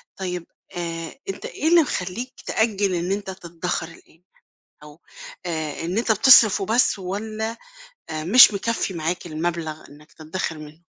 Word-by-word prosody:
طيب، 180 -3 -5 0.3
آآ، 165 -1 -5
أنت - - -6
إيه 315 - -3
اللي 340 0 +6
مخلّيك 240 - -4
تأجّل 205 -4 0
إن 175 +2 -2
أنت 200 -1 -3
تتدخَر 170 -2 -4
الآن؟ 165 0 -18 0.6
أو، 150 +2 -14 0.5
آآ، 160 -2 -4
إن 180 +6 -2
أنت 230 -1 +2
بتصرِف 215 -2 +7
وبس 220 +2 +2
والَّا، 215 +4 -4 0.5
آآ، 155 -1 -4
مش 215 +4 +8
مكفّي 210 -1 -2
معاك 170 +2 -3
المبلَغ 160 -1 -4
إنك 150 +1 -18
تتدخِر 160 0 -5
منُّه؟ 155 +2 -13
180 Hz, 140 wpm, -22 LUFS, 165-215 Hz, 0.6 s, مش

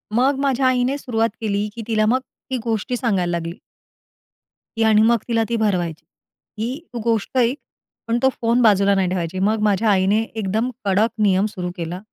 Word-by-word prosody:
मग 265 +3 +2
माझ्या 270 -2 +1
आईने 255 +2 +1
सुरुवात 230 -4 0
केली, 205 -1 -1
की 230 - -6
तिला 215 -1 +2
मग 250 +4 +3 0.3
ती 260 - -1
गोष्टी 230 +2 -2
सांगायला 195 -8 0
लागली. 170 0 -3 1.2
ती 225 - +2
आणि 215 -1 +5
मग 235 +1 +4
तिला 230 -1 +1
ती 235 - 0
भरवायची. 175 -7 -1 0.6
ही 250 +7 -3
तू 240 - -4
गोष्ट 230 +2 -1
ऐक 250 +3 +2 0.5
पण 230 +1 +1
तो 265 - +6
फोन 235 +2 +2
बाजूला 200 -3 +4
नाही 190 -2 +1
ठेवायची. 180 0 -3
मग 215 +3 +1
माझ्या 210 +1 +2
आईने 195 +3 +3
एकदम 220 +2 -2 0.2
कडक 200 +4 +3
नियम 195 0 +3
सुरू 180 -3 -5
केला, 175 +2 -4
220 Hz, 180 wpm, -21 LUFS, 195-235 Hz, 1.2 s, तो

